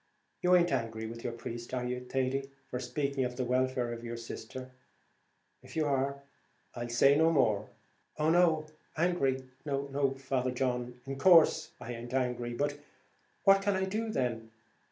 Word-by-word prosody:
You 180 0 +5
aint 175 -1 +4
angry 115 -3 -2
with 115 +1 -7
your 120 - -3
priest, 120 +1 -6
are 125 -1 -2
you, 125 0 -2
Thady, 135 +1 -1 0.2
for 125 - -2
speaking 140 +1 -1
of 125 0 -2
the 130 0 -1
welfare 125 -1 0
of 115 0 -8
your 120 0 -5
sister? 130 +2 -7 0.9
If - - -13
you 160 -1 +1
are, 140 0 0 0.5
I'll 120 0 -5
say 135 +4 +5
no 160 +2 +4
more." 110 -9 +2 0.5
"Oh 155 +1 +2
no! 165 -3 +4 0.3
angry, 145 -6 +1 0.7
Father 130 -1 -1
John! 125 -1 -2
in 135 0 -5
course 165 -2 +6
I 120 - -6
aint 120 +2 -6
angry. 125 -2 -1
But 145 +2 -1 0.6
what 195 0 +6
can 200 0 +1
I 190 0 +1
do 220 +4 -2
then? 120 - -2
130 Hz, 160 wpm, -31 LUFS, 120-150 Hz, 0.9 s, course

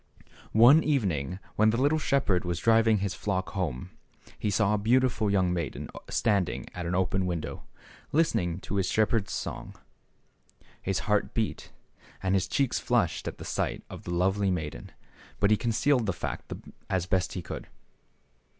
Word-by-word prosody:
One 130 +8 +8
evening 95 - 0 0.2
when 110 +1 +5
the 115 - +1
little 145 +4 +3
shepherd 135 - +1
was 90 -2 -2
driving 115 +3 +4
his 100 -1 -2
flock 95 -2 -2
home, 85 - -3 0.5
he 105 - 0
saw 105 +1 +2
a 105 - +1
beautiful 115 -1 +2
young 95 -3 +2
maiden 85 -5 -4 0.2
standing 100 -5 0
at 90 -1 -4
an 90 - -1
open 95 0 +1
window, 85 -3 -4 0.5
listening 90 - +1
to 100 - -3
his 95 -2 +1
shepherd's 110 -1 +1
song. - - -5 1.1
His 95 -1 -1
heart 105 -1 +1
beat 110 -2 -2 0.5
and 95 0 +1
his 95 -2 +2
cheeks 140 -3 +1
flushed - - 0
at - - -5
the - - -9
sight - - -2
of - - -8
the - - -5
lovely 95 +3 +1
maiden, 75 -9 -4 0.5
but 100 +1 +3
he - - +7
concealed 120 +2 +1
the 100 - +1
fact - - -5 0.4
as 95 -2 0
best 95 0 0
he 90 - -5
could. - - -7
100 Hz, 160 wpm, -28 LUFS, 90-115 Hz, 1.1 s, One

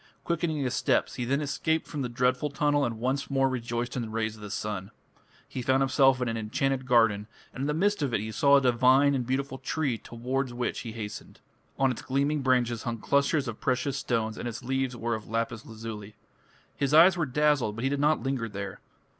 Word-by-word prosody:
Quickening 170 -2 -1
his 130 -3 -1
steps, - - +1
he 125 - -3
then 140 +4 0
escaped 160 +2 -1
from 145 - -4
the 125 - -2
dreadful 125 +4 +1
tunnel 145 0 +1
and 115 -3 -2
once 130 +4 -1
more 135 -1 +2
rejoiced 120 -1 -3
in 125 - -1
the 115 - -5
rays 110 -1 -2
of 110 - -14
the 105 - -7
sun. 100 -2 -4 0.6
He 130 - -5
found 130 +2 +2
himself 135 -1 +4
in 125 - -1
an 115 0 -2
enchanted 130 +4 -1
garden, 115 -4 +3 0.3
and - - -6
in 140 - 0
the 150 - 0
midst 205 +2 +1
of 140 -3 0
it 115 - +1
he 110 +2 -4
saw 140 +5 +4
a 140 - +5
divine 130 +3 +4
and 125 -3 -1
beautiful 130 0 -2
tree 135 -4 -1
towards 125 +2 -3
which 125 0 -2
he 115 -3 -6
hastened. 105 -2 -7 0.4
On 135 -1 +3
its 120 - -5
gleaming 140 +3 0
branches 125 -3 +1
hung 120 -2 -3
clusters 140 +4 +1
of 115 - -6
precious 130 +2 0
stones 115 -5 -1
and - - -4
its 120 +1 -6
leaves 130 -1 -1
were 115 0 -1
of 110 -2 -5
lapis 115 0 -2
lazuli. 110 -2 -8 0.6
His 140 +1 +1
eyes 175 +3 +8
were 165 -3 -1
dazzled, 145 -5 +2
but 115 - -5
he 135 - +2
did 140 - -1
not 150 +2 +2
linger 130 -4 -2
there. 100 -1 -6
130 Hz, 220 wpm, -28 LUFS, 115-140 Hz, 0.6 s, eyes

